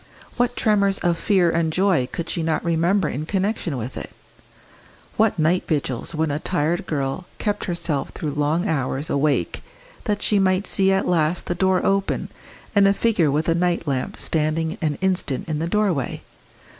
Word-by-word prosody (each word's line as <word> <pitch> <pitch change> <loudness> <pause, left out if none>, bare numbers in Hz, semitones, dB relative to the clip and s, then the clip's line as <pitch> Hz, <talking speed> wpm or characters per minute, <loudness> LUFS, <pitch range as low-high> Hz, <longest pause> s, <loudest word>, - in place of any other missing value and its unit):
What 245 0 +1
tremors 200 -3 +2
of 175 -1 +2
fear 185 -5 +3
and 165 -1 +1
joy 180 -7 +2
could 170 - -4
she 170 - -2
not 160 +1 -1
remember 170 +2 +2
in 150 +3 -4
connection 195 - -1
with 125 +2 -5
it? - - -6 1.1
what 220 -3 +2
night 170 +3 +2
vigils 145 -1 -2
when 155 -1 0
a 145 - -1
tired 170 0 -1
girl 140 +4 -2
kept 205 -2 -2
herself 165 -5 -2
through 150 - -4
long 150 +6 0
hours 140 -2 -1
awake 140 +1 0 0.4
that 205 -2 -1
she 205 - +3
might 190 +1 +2
see 195 -1 +3
at 195 0 +1
last 170 0 +1
the - - -1
door 185 +1 +1
open 195 0 0 0.5
and 200 -1 +6
a 200 - +3
figure 200 -10 +2
with 150 +3 0
a 165 - +4
night 175 0 0
lamp 130 -2 -2
standing 160 +1 -1
an 150 -3 0
instant 185 -8 0
in 155 -2 -2
the 165 - -1
doorway? 185 - 0
170 Hz, 175 wpm, -22 LUFS, 155-195 Hz, 1.1 s, and